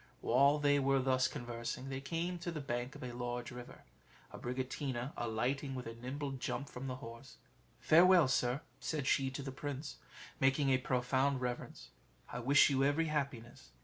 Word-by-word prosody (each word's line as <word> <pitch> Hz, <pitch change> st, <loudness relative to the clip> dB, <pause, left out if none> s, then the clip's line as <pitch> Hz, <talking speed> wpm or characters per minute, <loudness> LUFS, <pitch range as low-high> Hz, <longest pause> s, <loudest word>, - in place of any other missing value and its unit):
While 140 Hz, +2 st, +4 dB
they 145 Hz, -1 st, +3 dB
were 135 Hz, 0 st, +3 dB
thus 130 Hz, 0 st, +2 dB
conversing, 120 Hz, 0 st, -5 dB
they 135 Hz, 0 st, -4 dB
came 170 Hz, +5 st, -2 dB
to 170 Hz, 0 st, -4 dB
the 160 Hz, -, -4 dB
bank 120 Hz, -2 st, -3 dB
of -, -, -9 dB
a 125 Hz, -, -4 dB
large 120 Hz, 0 st, -4 dB
river: 125 Hz, 0 st, -10 dB, 0.5 s
Abricotina 130 Hz, +1 st, -3 dB
alighting 130 Hz, +4 st, -1 dB
with 125 Hz, -, -5 dB
a 115 Hz, -, -5 dB
nimble 135 Hz, +5 st, -5 dB
jump 135 Hz, +1 st, -4 dB
from 130 Hz, +2 st, -6 dB
the 130 Hz, -, -3 dB
horse 115 Hz, 0 st, -10 dB, 0.4 s
"Farewell, 175 Hz, -1 st, +6 dB
sir," 125 Hz, +1 st, +1 dB, 0.2 s
said 150 Hz, -4 st, -2 dB
she 135 Hz, 0 st, +2 dB
to 135 Hz, +1 st, -5 dB
the 135 Hz, -, -4 dB
prince, 145 Hz, +2 st, -5 dB, 0.4 s
making 135 Hz, +1 st, +3 dB
a 130 Hz, -, +4 dB
profound 130 Hz, 0 st, +1 dB
reverence, 120 Hz, -, -5 dB, 0.4 s
"I -, -, -4 dB
wish 135 Hz, +5 st, +6 dB
you 135 Hz, -1 st, +2 dB
every 150 Hz, +3 st, +2 dB
happiness." 140 Hz, -6 st, -4 dB
135 Hz, 170 wpm, -35 LUFS, 125-145 Hz, 0.5 s, Farewell